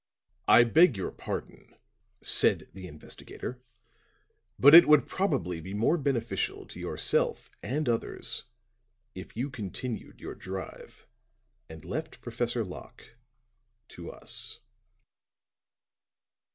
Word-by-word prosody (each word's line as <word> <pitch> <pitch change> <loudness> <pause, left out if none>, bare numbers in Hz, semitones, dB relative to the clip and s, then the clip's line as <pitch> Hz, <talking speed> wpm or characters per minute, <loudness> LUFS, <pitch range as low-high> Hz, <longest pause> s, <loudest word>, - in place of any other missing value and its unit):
"I 120 - +8
beg 150 - +5
your 95 - -3
pardon," - - -7 0.5
said - - +2
the 95 -1 -9
investigator, 90 +9 -9 1.0
"but 145 +3 +7
it 170 +1 +11
would 150 -4 +6
probably 115 - -1
be 95 +4 -7
more 115 +10 +3
beneficial 135 -7 -2
to - - -10
yourself - - -1
and 140 +7 -2
others, 115 +1 -1 0.7
if 95 +3 -10
you 135 +4 -2
continued 115 0 -6
your - - -7
drive 95 0 -8 0.6
and 80 -1 -11
left 155 - -5
Professor 120 -1 -2
Locke 90 +4 -12 0.7
to 85 - -9
us." - - -5
120 Hz, 105 wpm, -29 LUFS, 95-140 Hz, 1.0 s, it